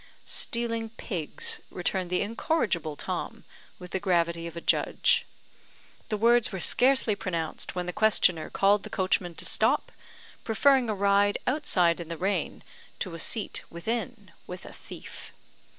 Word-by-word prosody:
"Stealing 230 Hz, -1 st, -1 dB
pigs," 185 Hz, -8 st, -2 dB
returned 180 Hz, 0 st, -2 dB
the 180 Hz, +2 st, +1 dB
incorrigible 205 Hz, -, -1 dB
Tom, -, -, -5 dB, 0.3 s
with 180 Hz, -1 st, -11 dB
the 190 Hz, -, -1 dB
gravity 170 Hz, -3 st, 0 dB
of 170 Hz, 0 st, -9 dB
a -, -, -2 dB
judge. 475 Hz, -, +2 dB, 0.8 s
The 215 Hz, -, 0 dB
words 235 Hz, +2 st, +4 dB
were 190 Hz, -, -4 dB
scarcely 255 Hz, +4 st, +3 dB
pronounced 170 Hz, -5 st, -3 dB
when 180 Hz, -1 st, -2 dB
the 180 Hz, -, -4 dB
questioner 185 Hz, -6 st, +2 dB
called 200 Hz, +1 st, +3 dB
the -, -, -9 dB
coachman 185 Hz, -3 st, 0 dB
to -, -, -2 dB
stop, -, -, +2 dB, 0.5 s
preferring 255 Hz, +2 st, +3 dB
a 215 Hz, -, 0 dB
ride 200 Hz, +1 st, +3 dB
outside 180 Hz, -, +2 dB
in 170 Hz, -, -6 dB
the 170 Hz, 0 st, -5 dB
rain 195 Hz, +4 st, -2 dB, 0.3 s
to 185 Hz, -, -4 dB
a 165 Hz, -, -7 dB
seat 215 Hz, +5 st, 0 dB
within 220 Hz, +2 st, -4 dB, 0.2 s
with 180 Hz, +1 st, -8 dB
a -, -, -10 dB
thief. -, -, -11 dB
195 Hz, 150 wpm, -27 LUFS, 175-225 Hz, 0.8 s, words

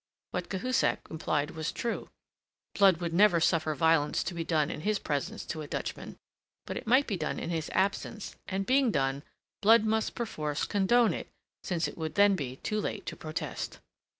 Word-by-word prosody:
What -, -, -3 dB
Cahusac 240 Hz, +6 st, +1 dB
implied 150 Hz, -2 st, -1 dB
was 160 Hz, 0 st, -3 dB
true: 235 Hz, -1 st, -3 dB, 0.6 s
Blood 195 Hz, -4 st, +5 dB
would 170 Hz, -1 st, -3 dB
never 185 Hz, -1 st, +5 dB
suffer 160 Hz, -2 st, +2 dB
violence 160 Hz, -2 st, +3 dB
to 175 Hz, -, -4 dB
be 170 Hz, -1 st, -3 dB
done 155 Hz, -2 st, +1 dB
in -, -, -5 dB
his 210 Hz, +4 st, +1 dB
presence 175 Hz, +7 st, -3 dB
to 160 Hz, -, -4 dB
a 150 Hz, -, -7 dB
Dutchman; -, -, -5 dB, 0.5 s
but -, -, -5 dB
it -, -, -6 dB
might 260 Hz, +5 st, +5 dB
be 200 Hz, -, -2 dB
done 155 Hz, -2 st, -2 dB
in -, -, -3 dB
his 160 Hz, -2 st, -2 dB
absence; 200 Hz, +2 st, -1 dB
and, 195 Hz, +1 st, -2 dB
being 260 Hz, +1 st, +4 dB
done, 135 Hz, -5 st, 0 dB, 0.4 s
Blood 220 Hz, +1 st, +6 dB
must 220 Hz, 0 st, 0 dB
perforce 150 Hz, -11 st, -2 dB
condone 220 Hz, +4 st, +3 dB
it, -, -, -6 dB, 0.3 s
since 175 Hz, -2 st, -1 dB
it -, -, -9 dB
would 160 Hz, -1 st, -3 dB
then 200 Hz, -1 st, +6 dB
be 130 Hz, -7 st, -4 dB
too 215 Hz, +9 st, -2 dB
late 205 Hz, -1 st, -4 dB
to -, -, -5 dB
protest. 155 Hz, 0 st, -5 dB
175 Hz, 185 wpm, -30 LUFS, 155-215 Hz, 0.6 s, Blood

